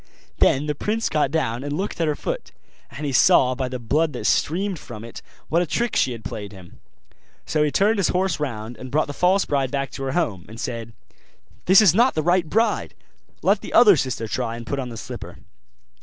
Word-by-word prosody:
Then 135 +2 +3
the 150 - -1
prince 215 +9 -2
got 150 -3 +1
down 130 -5 -1
and 145 - -4
looked 195 -2 -3
at 165 - +2
her 150 - 0
foot; - - -5 0.4
and 145 +5 -7
he 140 - -1
saw, 130 0 +5
by 130 0 -3
the 125 - -4
blood 150 +6 0
that 120 -4 -6
streamed 185 - 0
from 110 -3 -10
it, 115 - -9 0.3
what 170 +2 +2
a 175 - -1
trick 240 +8 -1
she 130 - +2
had 115 -3 -8
played 100 0 -6
him. 95 -4 -14 0.7
So 150 - 0
he 150 - +3
turned 200 +9 +2
his 190 - +2
horse 180 -4 0
round, 120 -5 -5
and 130 - -8
brought 155 +4 +1
the 145 - -7
false 185 +5 +2
bride 140 -2 0
back 140 0 -3
to - - -8
her 135 - -2
home, 110 - -1
and 115 +1 -10
said, 115 -3 -5 0.7
'This 190 +3 +7
is 195 -7 +6
not 240 +6 +3
the 155 - 0
right 175 -1 +2
bride; 225 +5 0 0.5
let - - +3
the - - -8
other 215 -5 +7
sister 130 -5 -2
try 115 0 -2
and 115 0 -8
put 140 - -3
on 130 -2 -4
the 115 - -8
slipper. - - -8
145 Hz, 225 wpm, -23 LUFS, 120-175 Hz, 0.7 s, This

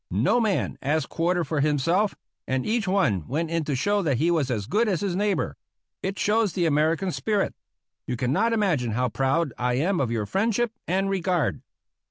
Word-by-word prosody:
No 125 - +2
man 215 -5 0
asked 150 +1 0
quarter 175 +1 0
for 150 0 -2
himself, 155 +8 +1 0.3
and 130 0 -1
each 220 -1 0
one 135 - +1
went 160 +3 -2
in 165 -1 0
to 145 - -1
show 205 +10 +1
that 145 -8 +1
he 165 +6 +2
was 155 -6 +1
as 110 -5 -2
good 220 - +1
as 190 -6 0
his 195 -3 -1
neighbor. 205 +1 0 0.4
It 195 +1 -3
shows 210 -3 +1
the 175 - 0
American 160 +4 +1
spirit. 205 +2 0 0.5
You 125 - -2
cannot 180 - +1
imagine 175 - +1
how 125 +2 0
proud 135 +5 0
I 125 0 +1
am 175 +8 +1
of 130 - 0
your 115 -3 -1
friendship 225 - 0 0.2
and 190 +3 +1
regard. 185 -6 0
170 Hz, 190 wpm, -25 LUFS, 135-200 Hz, 0.5 s, No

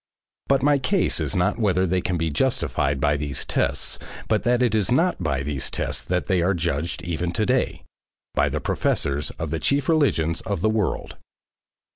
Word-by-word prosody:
But 135 -1 +2
my 145 0 +4
case 185 +8 +1
is - - -1
not 90 +5 +1
whether 95 -4 +2
they 90 0 +1
can 90 -1 -1
be 80 -1 -1
justified 75 - 0
by 75 +1 +2
these 70 -1 -2
tests - - -1 0.3
but 110 -1 +2
that 120 +1 +2
it 120 -3 +2
is 110 0 +1
not 165 - +2
by 70 -5 -1
these 70 -2 -2
tests - - -3
that 90 0 -1
they 95 -3 +1
are 95 +3 +2
judged 85 +1 -2
even 85 0 -2
to 110 - 0
day, 130 +2 0 0.5
by - - +2
the - - -2
professors 70 +2 0
of 80 -2 -4
the 80 - -1
chief 140 - +1
religions 110 - +2
of 100 -5 -3
the 110 +2 +2
world. 105 -7 -2
90 Hz, 190 wpm, -24 LUFS, 80-120 Hz, 0.5 s, my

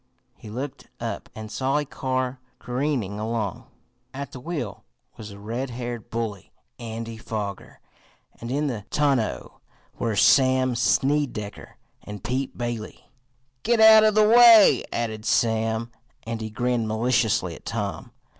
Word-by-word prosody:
He 110 - -12
looked 130 +5 -6
up, - - -5
and 110 -1 -8
saw 135 +4 0
a 150 - -1
car 130 -1 -3 0.2
careening 125 -6 -2
along. 110 -3 -3 0.5
At 140 -1 -6
the 130 - -9
wheel 140 - -5 0.3
was 110 -1 -9
the 100 - -11
red 115 +6 -4
haired 120 -2 -6
bully, 110 -5 -4 0.3
Andy 115 0 -6
Foger, 105 -4 -6 0.6
and 115 - -7
in 145 +4 0
the 120 -8 -3
tonneau 140 -7 -1 0.4
were 115 -3 -1
Sam 130 +1 +4
Snedecker 130 -4 -1 0.2
and 105 -1 -9
Pete 130 +2 -3
Bailey. 120 -3 -6 0.5
"Git 235 0 +1
out 220 0 +9
of 215 -1 +3
the 215 0 +5
way," 230 -2 +8
added 110 -2 -3
Sam, 115 0 0 0.3
and 115 0 -5
he 110 - -4
grinned 120 +1 -1
maliciously 110 -5 +1
at - - -13
Tom. 105 +3 -4
120 Hz, 135 wpm, -24 LUFS, 110-135 Hz, 0.6 s, out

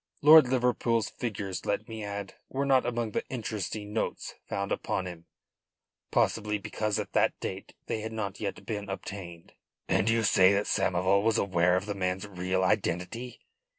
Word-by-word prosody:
Lord 155 -2 +9
Liverpool's 120 -3 +1
figures, 100 -5 -4
let 105 +2 -1
me 110 -1 -6
add, 100 -1 -5 0.2
were 135 +1 -1
not 135 -2 +3
among 120 -2 -1
the - - -1
interesting 105 -3 -4
notes 110 - -2 0.2
found 100 0 -2
upon 95 - -1
him 85 -2 -8 0.8
possibly 105 0 +1
because 105 +1 -2
at - - -4
that - - +2
date - - -6
they 110 - -2
had 110 +1 -5
not 105 -3 -4
yet 100 -2 -4
been 105 -3 -4
obtained." 95 -3 -7 0.3
"And 110 - +2
you 115 0 +2
say 95 -1 +5
that 100 +1 +1
Samoval 95 +2 +2
was 110 +1 +2
aware 90 -2 +3
of 95 +2 -1
the 105 - -2
man's 95 0 -2
real 95 -1 -1
identity?" 105 +6 -1
105 Hz, 165 wpm, -29 LUFS, 95-115 Hz, 0.8 s, Lord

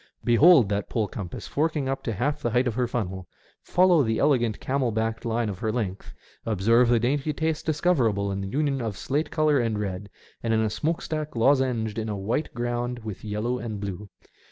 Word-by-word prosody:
Behold 130 - +6
that 100 0 -2
pole 110 -3 0
compass 95 -2 -7
forking 150 -2 -1
up 135 0 -2
to 115 - -3
half 125 +8 -1
the 120 - 0
height 125 +3 +2
of 125 - 0
her 125 +1 0
funnel; 95 -6 -4 0.3
follow 180 -2 +4
the 110 -4 0
elegant 120 -7 +2
camel 130 -3 0
backed 110 +1 -2
line 115 0 0
of 100 -3 -5
her 110 - -1
length; 105 -5 -4 0.3
observe 115 +3 +3
the 120 -1 +4
dainty 135 +5 0
taste 160 0 -2
discoverable 125 - +1
in 100 0 -3
the 95 - -4
union 140 +2 0
of 110 -5 -3
slate 145 - -1
colour 155 -3 +2
and 115 -3 0
red, 100 -1 -4 0.3
and 115 -1 +1
in - - +2
a 110 -1 0
smoke 160 +8 -1
stack 155 -2 -4
lozenged 120 -3 +2
on 110 0 -3
a 105 - -3
white 115 +10 -2
ground 120 0 -2
with 105 -4 -7
yellow 110 +4 -2
and 110 -3 -5
blue. 100 0 -6
120 Hz, 205 wpm, -26 LUFS, 105-140 Hz, 0.3 s, Behold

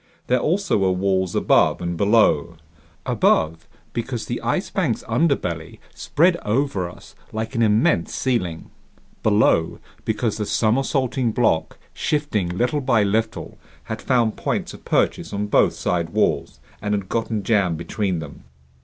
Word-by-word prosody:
There 125 0 +2
also 180 - +1
were 95 -1 +2
walls 95 -1 0
above - - +3
and 85 0 -3
below. 100 -5 +3 0.5
Above, 80 +1 +1 0.3
because 120 0 -3
the - - -4
Ice - - -1
Bank's - - -1
underbelly 90 - -1 0.2
spread 170 +3 +2
over 105 - -1
us 85 - -14 0.2
like 110 +3 -4
an 115 - 0
immense 105 -6 +2
ceiling. 90 -11 -2 0.5
Below, 105 -6 +2 0.3
because 110 0 -1
the 105 -2 -3
somersaulting 125 +1 +1
block, 110 -10 +1 0.2
shifting 145 - -1
little 120 +11 0
by 120 -5 +3
little, 110 +3 -2 0.2
had 110 0 -6
found 120 -4 +1
points - - -2
of - - -14
purchase - - 0
on 100 +1 -1
both 105 - +3
side 85 -2 -1
walls - - 0 0.2
and 105 0 0
had 100 -2 -4
gotten 110 -1 -2
jammed 95 -6 +1
between 95 +2 -2
them. 80 -3 -9
110 Hz, 140 wpm, -22 LUFS, 90-120 Hz, 0.5 s, above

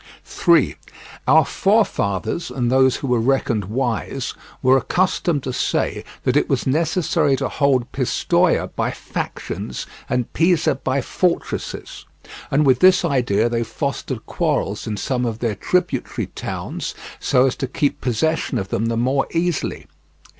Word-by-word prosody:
3. 170 -5 +3 0.5
Our 155 +3 +6
forefathers, 170 - 0
and 125 -1 -1
those 130 0 +4
who 140 - -4
were 125 -2 +2
reckoned 115 -5 +1
wise, 115 +2 -2 0.3
were 130 +1 +6
accustomed 170 0 +1
to 130 - -3
say - - -1 0.2
that - - +1
it - - +2
was - - 0
necessary 155 -1 +2
to - - -1
hold 135 -4 +1
Pistoia 130 -3 +1
by - - 0
factions - - -5 0.2
and 125 -2 -1
Pisa 165 -2 +3
by 135 0 -1
fortresses; 175 +7 -2 0.4
and 145 +2 +3
with 130 -2 +4
this 185 -1 +5
idea 125 -8 +2
they 120 0 -1
fostered 130 -1 -4
quarrels 145 - -1
in 105 -1 -3
some 125 +4 -1
of 115 -3 -2
their 115 -2 -1
tributary 175 - -1
towns - - -5 0.2
so 125 +1 +3
as 130 - +1
to 135 - -2
keep 145 +2 -1
possession 160 +7 0
of 95 -1 -3
them 110 +3 0
the 115 0 -1
more 130 +3 +1
easily. 170 -2 -1
130 Hz, 145 wpm, -21 LUFS, 120-160 Hz, 0.5 s, Our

